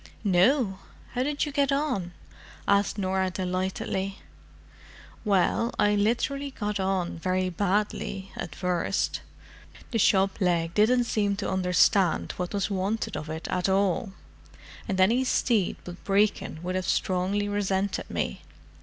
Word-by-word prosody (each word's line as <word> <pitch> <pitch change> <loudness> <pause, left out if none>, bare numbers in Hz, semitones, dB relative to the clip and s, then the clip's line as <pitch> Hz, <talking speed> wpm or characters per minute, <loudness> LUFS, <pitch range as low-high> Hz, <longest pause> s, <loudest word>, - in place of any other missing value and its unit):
"No! 195 +2 +3 0.3
How 250 - -1
did 290 +3 0
you 295 - -5
get 280 -1 +1
on?" 255 - -1 0.5
asked 200 +1 +2
Norah 190 -1 0
delightedly. 190 +1 -2 1.1
"Well, 210 +3 +2
I 210 0 +3
literally 240 +7 0
got 210 -5 -3
on 190 -3 -1
very 185 +1 0
badly—at 195 -1 -2
first. 180 -2 -1 0.7
The 230 - 0
shop 195 0 +3
leg 170 -2 +1
didn't 240 +5 +4
seem 205 -3 0
to 200 - -3
understand 185 -1 +3
what 180 -1 -3
was 200 +1 -1
wanted 200 +2 -1
of 155 0 -5
it 160 +1 -5
at 185 0 0
all, 195 +1 +1 0.7
and 190 -1 -1
any 230 +8 +4
steed 230 -6 +1
but 175 0 -10
Brecon 200 -5 +1
would 180 +1 -2
have 185 -1 -2
strongly 190 +2 0
resented 200 -1 -1
me. - - -3
195 Hz, 130 wpm, -27 LUFS, 185-210 Hz, 1.1 s, didn't